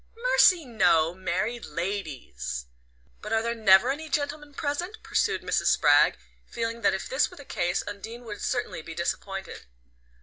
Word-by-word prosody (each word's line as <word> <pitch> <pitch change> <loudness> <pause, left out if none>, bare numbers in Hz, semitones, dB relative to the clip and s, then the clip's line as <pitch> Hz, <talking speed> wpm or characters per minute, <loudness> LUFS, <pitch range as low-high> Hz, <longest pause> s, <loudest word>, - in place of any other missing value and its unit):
"Mercy, 470 -9 +4
no! 170 -9 +3
Married 190 +6 -2
ladies." 150 - -4 0.6
"But 210 - -7
are 225 0 +2
there 235 0 -1
never 220 +1 +5
any 310 +3 -5
gentlemen 290 0 -3
present?" 345 +10 -3
pursued - - 0
Mrs. - - 0
Spragg, - - +5 0.3
feeling 230 0 -4
that - - +3
if 190 - -5
this 265 +2 +1
were - - -15
the 285 - -11
case 175 -6 -1
Undine 220 +4 -8
would 210 -3 -8
certainly 245 -9 -2
be 165 +1 -9
disappointed. 195 - -4
225 Hz, 155 wpm, -27 LUFS, 185-285 Hz, 0.6 s, never